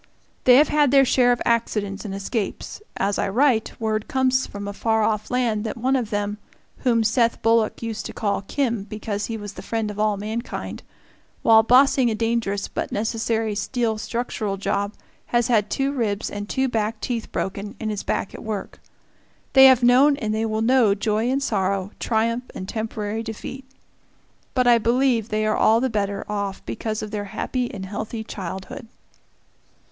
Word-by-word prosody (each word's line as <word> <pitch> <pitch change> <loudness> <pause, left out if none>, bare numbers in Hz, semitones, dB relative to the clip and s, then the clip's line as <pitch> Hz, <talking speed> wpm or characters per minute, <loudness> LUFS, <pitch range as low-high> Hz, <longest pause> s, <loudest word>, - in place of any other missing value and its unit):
They 250 - +8
have 290 +3 +6
had 295 -2 +3
their 275 +1 +6
share 245 -1 +4
of 245 - 0
accidents 210 -3 0
and 195 -2 -4
escapes; 200 - -4 0.2
as 200 +1 0
I - - 0
write, 240 +1 +1
word 215 -1 -1
comes 260 0 +1
from 200 0 -7
a 200 - -4
far 220 +1 +1
off 215 -1 0
land 235 -4 0
that 225 - -4
one 260 +3 +1
of 245 -5 -1
them, 205 -1 -2 0.4
whom 235 -3 +2
Seth 230 +1 +2
Bullock 225 0 +2
used 220 -1 -4
to - - -7
call 205 -3 -1
"Kim" 235 0 -1
because 210 0 -4
he 225 - -4
was 205 -1 -7
the - - -9
friend 225 -2 -2
of 205 - -9
all 210 -1 +2
mankind, 220 +4 -5 0.6
while 220 -1 +7
bossing 255 +2 +5
a 220 - -1
dangerous 225 -3 -1
but - - -4
necessary 225 0 -1
steel 220 +1 -1
structural 220 -4 -3
job 200 +1 -1 0.3
has 240 0 +1
had 215 -3 +2
two 275 +1 0
ribs 220 -7 -2
and 205 0 -6
two 265 0 +1
back 220 -2 -1
teeth 235 -1 -3
broken, 200 +2 -4
and 220 -1 -2
is 205 - -3
back - - -2
at - - -9
work. 215 -2 -5 0.7
They 265 0 +9
have 255 -2 +5
known 265 +4 +5
and 215 -4 -2
they 220 +1 0
will 220 0 -1
know 235 -4 +4
joy 215 +3 0
and 275 +2 0
sorrow, 195 -4 -1
triumph 230 +2 0
and 185 - -6
temporary 220 0 -3
defeat. 230 +4 -7 0.9
But 255 -1 +3
I 240 -1 +6
believe 235 -1 +2
they 215 0 0
are 215 - +1
all 225 +1 +4
the 260 0 0
better 200 -2 -2
off 200 -2 -4
because 215 -1 -3
of 210 - -6
their 205 -1 -3
happy 245 +4 -3
and 190 -2 -6
healthy 215 +3 -5
childhood. 190 +4 -7
220 Hz, 185 wpm, -23 LUFS, 210-245 Hz, 0.9 s, They